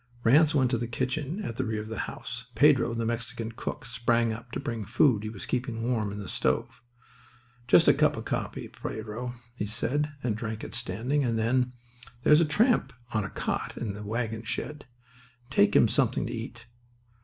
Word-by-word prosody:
Ranse 150 +6 +5
went 130 -3 +3
to 120 - +1
the 120 - -2
kitchen 140 - -2
at 115 - -5
the 130 - 0
rear 110 -3 -2
of 105 - -6
the 110 -2 -5
house. - - -7
Pedro, 135 -5 +5
the 115 0 -1
Mexican 115 0 -3
cook, 140 +5 -5
sprang 115 -1 +1
up 115 +2 -9
to - - -3
bring 120 -5 -3
the 100 - -7
food 120 -1 +4
he 110 - -4
was 110 -3 -6
keeping 120 -2 -2
warm 115 -4 0
in 100 - -6
the 100 -2 -6
stove. - - -1 0.9
"Just - - +6
a - - +8
cup - - +3
of - - -5
coffee, - - -3
Pedro," 115 +3 -5 0.2
he 105 -4 -3
said, 145 +7 -1
and 115 -4 0
drank 110 -1 -4
it - - -7
standing. 115 +6 0
And 115 -3 0
then: 125 +3 +1 0.5
"There's 150 +2 +7
a - - +4
tramp 220 - +2 0.2
on 110 -2 +1
a 100 - -4
cot - - -3
in 110 -4 -3
the 105 - -8
wagon 110 +1 -2
shed. 145 +5 -5 0.6
Take 100 -5 +4
him - - +7
something 125 +1 +1
to - - -4
eat. 115 0 -7
115 Hz, 200 wpm, -28 LUFS, 110-130 Hz, 0.9 s, a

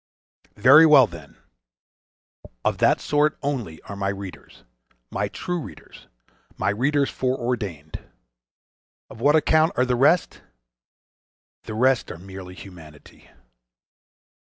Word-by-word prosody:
Very 140 +9 +7
well, 145 -4 +7
then! 85 -8 -13 1.3
of - - 0
that - - +3
sort 150 +1 0
only 120 - -4
are 100 - -9
my 100 0 -2
readers, 95 -1 -9 0.5
my - - -2
true 175 -1 -4
readers, - - -13 0.5
my 95 - 0
readers 140 +6 0
foreordained: 115 - -3 1.1
of 115 - -12
what 145 +4 +4
account 160 +1 +3
are 125 - +2
the 125 -1 0
rest?—The - - -4
rest 130 +2 +1
are - - -8
merely 95 0 -11
humanity. 80 -7 -15
115 Hz, 110 wpm, -23 LUFS, 90-140 Hz, 1.3 s, Very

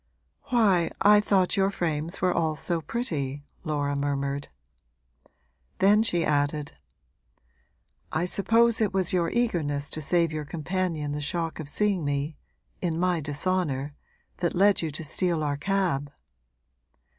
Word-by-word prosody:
'Why, 210 -10 +3
I 210 +1 +6
thought 195 -3 +2
your 195 0 +3
frames 165 -2 -3
were 180 -1 +3
all 160 -2 0
so 165 +3 -2
pretty!' 145 - -3 0.2
Laura 145 -3 -1
murmured. 140 0 -2 1.3
Then 205 +3 +5
she 175 -7 +1
added: 145 0 0 1.4
'I 160 +2 0
suppose 225 +5 +3
it 205 -3 +1
was 190 -2 +2
your 170 -2 +2
eagerness 155 -12 -1
to 155 - -3
save 170 +2 +2
your 155 -1 -3
companion 160 0 -2
the 150 0 -3
shock 165 +2 -2
of 150 -2 -4
seeing 200 -1 +1
me 145 +2 -2 0.5
in 170 -2 -1
my 180 -1 +1
dishonour 145 -2 -1 0.4
that 175 -1 -1
led 200 +2 +4
you 165 - -2
to 155 +2 -6
steal 165 +1 0
our 145 -1 0
cab.' 155 -4 -1
165 Hz, 135 wpm, -26 LUFS, 145-190 Hz, 1.4 s, I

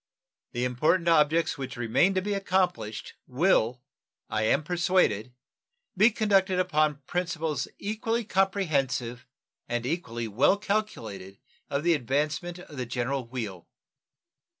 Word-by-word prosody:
The 120 +1 0
important 155 +8 +1
objects 160 -1 +3
which 130 -2 -5
remain 120 - +2
to 185 - +1
be 205 +1 -1
accomplished 180 - -1
will, 125 -4 +2 0.5
I 110 - 0
am 140 - +2
persuaded, 170 - +1 0.6
be 210 +5 +6
conducted 195 -4 +2
upon 155 -5 +1
principles 165 -5 -2
equally 225 +3 -2
comprehensive 155 - 0 0.4
and 120 0 -1
equally 120 -7 -3
well 120 - +3
calculated 115 - -3 0.3
of 140 +1 -1
the 170 0 +4
advancement 150 +5 -1
of 155 -5 -12
the 125 -2 -3
general 125 +1 -2
weal. 110 -8 -6
150 Hz, 120 wpm, -27 LUFS, 125-185 Hz, 0.6 s, be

